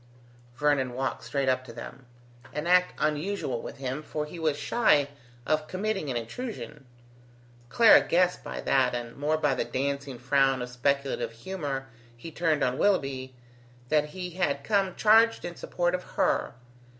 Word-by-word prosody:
Vernon 140 -4 +1
walked 130 -3 -2
straight 135 +3 -1
up 130 0 +2
to 125 - -10
them: 125 +2 -10 0.5
an 150 +2 -3
act 180 +1 +4
unusual 150 -5 -1
with - - -8
him, 135 +2 -4
for 150 0 -4
he 165 +3 -9
was 155 -3 0
shy 145 -4 +3 0.4
of 155 0 0
committing 190 -4 -2
an 125 - -1
intrusion. 130 - -7 0.8
Clara 230 - +7
guessed 180 +1 +1
by - - -5
that, 130 -2 +2
and 120 -1 -5
more 150 +2 0
by 150 -3 +1
the 130 - -1
dancing 140 0 -3
frown 135 +2 +2
of 125 - -6
speculative 135 -2 -1
humour 140 0 -4 0.3
he 160 +8 -9
turned 160 -2 +1
on 125 +3 0
Willoughby, 135 -9 0 0.5
that 150 -1 +3
he 180 +4 -6
had 145 -6 -1
come 195 -2 +1
charged 225 +1 +4
in 175 0 -5
support 175 +1 -1
of 180 - -1
her. - - 0
145 Hz, 160 wpm, -28 LUFS, 130-175 Hz, 0.8 s, Clara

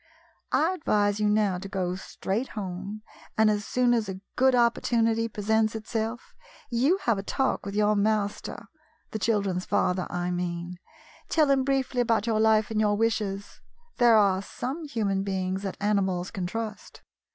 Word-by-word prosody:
I 320 +6 +3
advise 210 - +1
you 210 0 +2
now 210 -3 +2
to 195 +1 -8
go 185 -3 -1
straight 195 +5 -3
home, 195 +2 -5 0.3
and, 220 0 +5
as 210 0 -1
soon 250 -1 +2
as 225 -4 0
a 190 0 -5 0.2
good 260 0 +4
opportunity 230 -1 +2
presents 220 +1 0
itself, 225 +1 -4 0.4
you 265 +10 +3
have 225 -4 +2
a - - -2
talk 265 +1 -1
with 200 - -5
your 210 0 +3
master 205 0 -1 0.2
— 310 - -40
the 220 - -3
children's 195 -3 0
father, 180 0 +1
I 175 0 -2
mean. 175 0 -4 0.5
Tell 305 -4 +3
him 270 -1 +3
briefly 265 -2 0
about 230 -3 +1
your 225 -2 +1
life 220 0 +3
and 215 -1 +1
your 205 -1 +2
wishes. 210 -3 -2 0.4
There 240 -3 +6
are 195 -2 +3
some 270 +10 -5
human 205 -8 -1
beings 190 -1 -2
that 195 -2 -5
animals 195 -3 0
can 185 -2 -3
trust. 215 +1 -6
210 Hz, 165 wpm, -27 LUFS, 195-230 Hz, 0.5 s, There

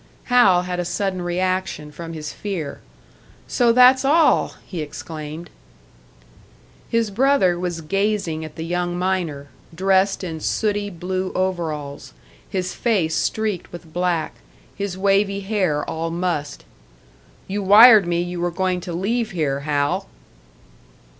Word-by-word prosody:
Hal 240 -8 +4
had 180 0 -4
a - - 0
sudden 185 +1 -2
reaction 180 -3 -2
from 165 +2 -8
his 150 -2 -6
fear. 175 -9 -5 0.7
"So 240 -2 +3
that's 255 +2 +6
all!" 310 +4 +3
he 175 -4 -5
exclaimed. 155 +2 -7 1.4
His 230 -2 0
brother 225 -6 +3
was 175 -2 -3
gazing 195 -2 -1
at 155 -1 -9
the 160 - -5
young 175 +1 -2
miner, 175 -6 -2 0.3
dressed 190 +2 +2
in 165 -3 -5
sooty 205 +4 -1
blue 185 +1 -3
overalls, 160 - -3 0.4
his 185 -1 -2
face 195 -9 0
streaked 215 -5 -2
with 170 -2 -11
black, 175 -2 -1 0.4
his 200 -2 -4
wavy 200 +1 +2
hair 190 -8 -1
all 165 +1 -3
mussed. 170 -4 -3 0.8
"You 205 +2 -2
wired 210 0 +8
me 175 0 0
you 175 0 -5
were 175 - +1
going 185 0 -1
to 175 -1 -6
leave 220 +6 -1
here, 150 -6 -1
Hal!" 145 0 -1
180 Hz, 130 wpm, -21 LUFS, 165-200 Hz, 1.4 s, wired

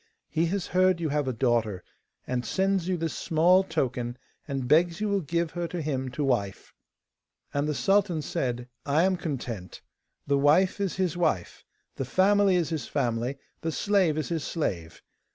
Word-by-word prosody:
He 165 +1 +1
has 195 +2 -2
heard 185 -1 +3
you 165 -2 -1
have 145 -1 0
a - - +1
daughter, 115 -6 0 0.4
and 125 -1 -2
sends 190 0 0
you 185 -1 0
this 165 -1 -3
small 175 +4 +4
token, 125 -7 -2 0.3
and 135 -3 -3
begs 165 +5 +3
you 215 - 0
will 200 -1 +1
give 170 +1 -1
her 175 0 -3
to 175 - -5
him 135 -4 -2
to 145 - -2
wife.' 105 -8 -1 0.8
And 145 +1 0
the 150 - -1
sultan 195 -4 +2
said: 125 -3 -2 0.2
'I 145 +4 +2
am 190 0 +3
content. 125 - -5 0.4
The 140 0 +2
wife 165 +8 +4
is 195 -3 -1
his 185 -4 0
wife, 130 - -1 0.3
the 135 - -2
family 195 +5 +4
is 175 -3 +1
his 160 -4 -3
family, 120 +3 -1 0.2
the 165 - -1
slave 185 -3 +2
is 155 - -2
his 165 -3 -2
slave. 85 - -3
155 Hz, 175 wpm, -27 LUFS, 130-180 Hz, 0.8 s, small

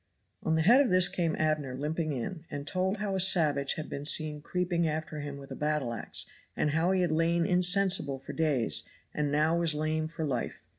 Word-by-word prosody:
On 160 - 0
the 160 - +2
head 240 +10 +6
of 275 - +1
this 185 -1 +6
came 175 -3 -1
Abner 155 -4 -1
limping 155 +3 -2
in, 145 +6 -5
and 145 0 -6
told 190 +5 -1
how 205 -1 -3
a 190 - -1
savage 155 -7 +4
had 155 - -6
been 140 - -6
seen 150 -1 +2
creeping 175 0 -1
after 155 0 -4
him 145 -1 -6
with 140 -1 -12
a - - -5
battle 150 -5 -1
ax, 115 - -3 0.3
and 150 - +1
how 160 +4 +1
he 190 -1 +2
had 175 -3 0
lain 165 +1 +1
insensible 180 -4 +2
for 135 - -9
days, 150 -8 0 0.3
and 150 -1 -1
now 155 +3 +2
was 170 -3 +2
lame 155 +1 -1
for 160 0 -5
life. 130 -5 -4
155 Hz, 210 wpm, -29 LUFS, 150-180 Hz, 0.3 s, head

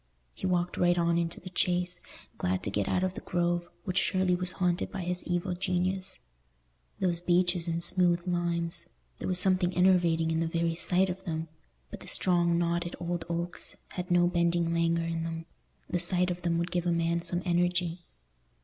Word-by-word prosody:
He - - -4
walked 175 -1 0
right 175 0 +3
on 170 0 +2
into 165 -1 -3
the 185 +1 -10
Chase, 180 0 0 0.4
glad 90 +1 -1
to 100 - -2
get 100 0 -1
out 180 - +1
of 185 0 0
the - - -7
Grove, 175 0 -1
which 185 -3 0
surely 185 -1 +2
was 180 0 -2
haunted 180 -1 0
by 195 - -4
his 180 +1 -2
evil 175 +1 -1
genius. 185 +1 -2 0.8
Those 175 -3 +2
beeches 175 0 +1
and 170 0 -1
smooth 175 -1 +2
limes—there 170 - -4
was 185 - +1
something 185 -1 +4
enervating 175 -3 +3
in 160 - 0
the 165 - 0
very 165 0 0
sight 180 +3 +2
of 190 +1 -8
them; 160 -2 -3 0.4
but - - -7
the - - -13
strong 175 -2 +3
knotted 170 0 -1
old 175 -1 -3
oaks 170 +1 -4
had 180 0 -5
no 175 0 +4
bending 170 -1 +1
languor 170 0 +1
in 165 0 -2
them—the 165 +2 -6
sight 180 +1 +4
of 175 0 -5
them 170 -1 0
would 170 +1 -2
give 175 -1 -1
a - - +2
man 170 0 +1
some 175 +1 0
energy. 175 0 +1
175 Hz, 185 wpm, -29 LUFS, 170-180 Hz, 0.8 s, something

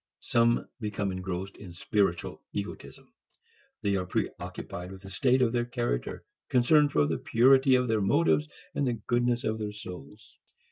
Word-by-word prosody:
Some 120 0 +2
become 105 -3 -2
engrossed 95 +1 -5
in 90 -4 -10
spiritual 95 -1 -1
egotism. - - -7 0.7
They 100 -1 +1
are 90 -1 -3
preoccupied 90 0 -4
with 95 0 -11
the 95 - -10
state 130 +4 +3
of 115 - +2
their 120 0 0
character, 120 - -3 0.2
concerned 145 +4 +4
for 75 - +3
the - - -1
purity 130 +3 +5
of 125 0 +2
their 110 -2 +1
motives 150 +7 +2 0.2
and 140 - 0
the 125 - +1
goodness 120 +1 0
of 110 0 -1
their 105 -1 -3
souls. 105 +1 -11
110 Hz, 155 wpm, -28 LUFS, 95-125 Hz, 0.7 s, purity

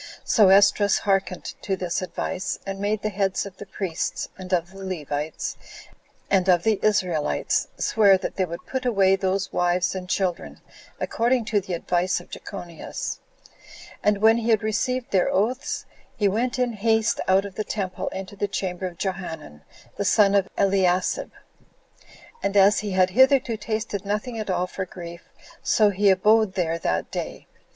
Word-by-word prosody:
So 210 -5 +5
Esdras 200 +1 +5
hearkened 195 -2 -1
to 195 - -1
this 180 -1 -2
advice, 185 +1 -3
and 195 0 -5
made 205 +1 -1
the 215 - 0
heads 195 -1 -1
of 195 -1 -10
the 205 - -9
priests, 185 -4 -3
and 185 -1 -9
of 175 0 0
the 195 0 -10
Levites, 155 -4 -4 0.7
and 190 -1 +2
of 175 -2 +4
the 220 -2 +2
Israelites, 180 -8 +1
swear 200 -3 +4
that 185 - -5
they 190 - +1
would 170 -1 -8
put 260 -1 -3
away 195 -6 +3
those 195 +1 -1
wives 175 0 +1
and 185 -1 -6
children, 185 -2 -2 0.4
according 235 0 +1
to 210 -2 +1
the 185 -1 -6
advice 180 +2 0
of - - -16
Jechonias. 175 -5 -6 0.8
And 210 0 +1
when 225 +1 +6
he 235 0 -2
had 220 -1 +3
received 245 +3 -1
their 185 -2 +3
oaths, 240 +8 -1 0.3
he 205 - +2
went 235 +6 0
in 250 -2 0
haste 220 +1 +1
out 190 +1 +4
of 200 - -7
the 215 - -3
temple 195 -4 -4
into 190 +1 -6
the 205 +1 -1
chamber 185 -2 -3
of 175 -2 -10
Johanan, 165 - -5 0.4
the - - -1
son 200 0 +4
of 195 -2 +3
Eliasib, 190 -2 +1 1.1
and 200 - 0
as 200 +1 +6
he 205 -2 -4
had 185 0 +3
hitherto 260 0 +4
tasted 215 -2 -3
nothing 210 +4 -3
at 215 - -4
all 180 -1 +1
for 190 +1 -5
grief, 170 -1 -10 0.3
so 210 -2 +3
he 200 +1 +3
abode 210 +1 +3
there 170 -3 0
that 85 - -1
day. - - -5
195 Hz, 170 wpm, -24 LUFS, 185-215 Hz, 1.1 s, when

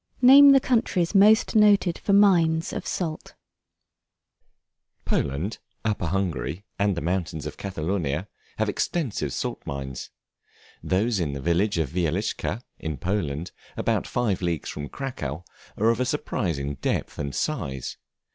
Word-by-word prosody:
Name 280 +3 +9
the 275 -1 +8
countries 225 -9 +1
most 215 +4 +5
noted 205 -5 +4
for - - -1
mines 170 -5 +4
of - - -5
Salt. 160 -4 -4 1.7
Poland, 75 +11 -1 0.3
Upper 105 -5 0
Hungary, 90 -1 -2
and 100 -2 +1
the - - -2
mountains 90 -2 -2
of - - -5
Catalonia, 90 -3 -2 0.3
have 110 - +1
extensive 105 - -1
salt - - -3
mines; 70 -2 -6 0.7
those 100 +3 +1
in 75 -5 -1
the 70 - -4
village 85 +7 +1
of 80 -5 -1
Wieliczca, 90 +6 -1 0.2
in 80 -3 -4
Poland, 85 -1 -2 0.3
about - - 0
five 110 -7 0
leagues 85 -4 -2
from 75 -1 -6
Cracow, 90 - -5 0.3
are 110 +2 +3
of 115 - -2
a 130 - +1
surprising 85 - -2
depth - - -2
and 70 -2 -3
size. 65 -1 -3
95 Hz, 135 wpm, -25 LUFS, -, 1.7 s, Name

